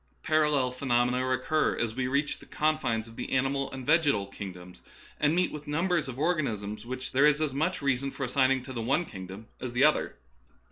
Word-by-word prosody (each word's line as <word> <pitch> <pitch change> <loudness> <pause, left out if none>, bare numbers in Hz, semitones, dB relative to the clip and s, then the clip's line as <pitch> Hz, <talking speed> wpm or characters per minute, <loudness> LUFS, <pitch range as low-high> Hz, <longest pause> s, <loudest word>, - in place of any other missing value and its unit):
Par 155 0 +3
allel 140 -4 +2
phenomena 125 -1 +1
recur 130 +4 +1
as 115 -2 -1
we 125 +1 -1
reach 140 +3 0
the - - -15
confines 150 -8 0
of 115 - -14
the - - -5
animal 135 +1 0
and 130 -1 -7
vegetal 145 -10 +3
kingdoms, 90 -2 -9 0.4
and 150 +2 +3
meet 180 0 +2
with 150 0 -8
numbers 165 0 0
of 130 -1 -6
organisms 115 - -1
which 130 +1 -5
there 140 +3 +5
is 150 0 +3
as 155 -4 0
much 155 +3 -1
reason 135 0 +1
for 135 - -6
assigning 130 0 +2
to 130 0 -8
the 120 - -3
one 135 +9 +1
kingdom 95 - -9
as 125 - -4
to - - -10
the 130 - +4
other. 155 +1 +3
130 Hz, 205 wpm, -28 LUFS, 120-150 Hz, 0.4 s, there